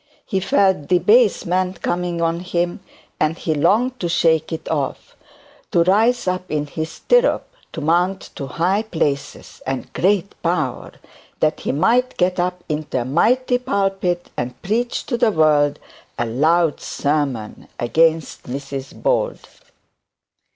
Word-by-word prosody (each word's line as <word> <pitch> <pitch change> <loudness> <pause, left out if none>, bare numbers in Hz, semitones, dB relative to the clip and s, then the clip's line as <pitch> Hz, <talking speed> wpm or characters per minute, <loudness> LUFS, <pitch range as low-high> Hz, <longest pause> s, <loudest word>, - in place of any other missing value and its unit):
He 190 - -1
felt 190 -5 +2
debasement 185 - +2
coming 175 -1 -1
on 165 0 0
him, 175 -1 -2 0.4
and 155 +2 +1
he 160 - -1
longed 240 - +2
to 175 - -2
take 160 -2 +2
it 160 - -5
off, 145 -4 -3 0.5
to 170 - +3
rise 220 +6 +2
up 185 0 -2
in 150 -1 -1
his 160 +2 -4
stirrup, - - +2 0.2
to 160 - -6
mount 175 +5 0
to 140 - -6
high 175 +10 +1
places 155 -10 -3
and 135 -1 -4
great 195 +1 +1
power, 155 -7 -2 0.5
that 155 0 +1
he - - -2
might 235 - +2
get 180 0 +1
up 180 0 -1
into 150 -4 -2
a - - -4
mighty 245 - +2
pulpit 195 -7 -1
and 125 0 -4
preach 235 +5 -1
to 240 -3 -2
the 240 -3 +4
world 150 -5 +3 0.4
a 120 - 0
loud 155 +7 +2
sermon 140 -7 -2
against 160 +5 +1
Mrs 135 0 -6
Bold. - - 0
170 Hz, 135 wpm, -20 LUFS, 150-195 Hz, 0.5 s, the